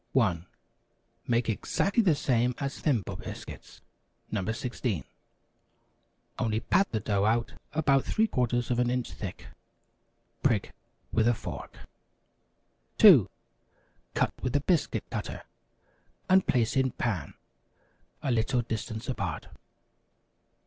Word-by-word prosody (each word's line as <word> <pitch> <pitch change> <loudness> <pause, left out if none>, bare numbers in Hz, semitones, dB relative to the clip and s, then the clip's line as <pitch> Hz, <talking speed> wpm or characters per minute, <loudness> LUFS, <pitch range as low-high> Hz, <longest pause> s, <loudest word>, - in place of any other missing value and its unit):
1. 85 -1 +2 0.8
Make 120 0 +1
exactly 195 - +1
the 180 -8 +4
same 125 -3 +1
as 140 -1 -4
Thimble 125 - 0
Biscuits - - -9 0.5
(No. 105 -3 -1
16), 115 - -3 1.4
only 110 -3 +1
pat 190 +11 +2
the 110 - 0
dough 100 -1 0
out 115 +2 +1 0.2
about 140 -3 +3
three 220 - +2
quarters 120 - 0
of 120 - +1
an 125 -1 +2
inch 125 -1 -1
thick. 95 -4 -7 1.0
Prick - - +1 0.4
with 115 0 +3
a 120 - +4
fork. - - -7 1.2
2. - - +8 0.9
Cut - - +1
with 130 +1 -2
a 145 - +3
biscuit 170 0 +1
cutter, - - -4 0.8
and 185 0 +4
place 120 -4 +2
in 130 -1 +3
pan, 100 -11 -2 0.9
a 135 - 0
little 120 +1 +1
distance 110 +1 -4
apart. 100 - -3
120 Hz, 115 wpm, -29 LUFS, 110-135 Hz, 1.4 s, 2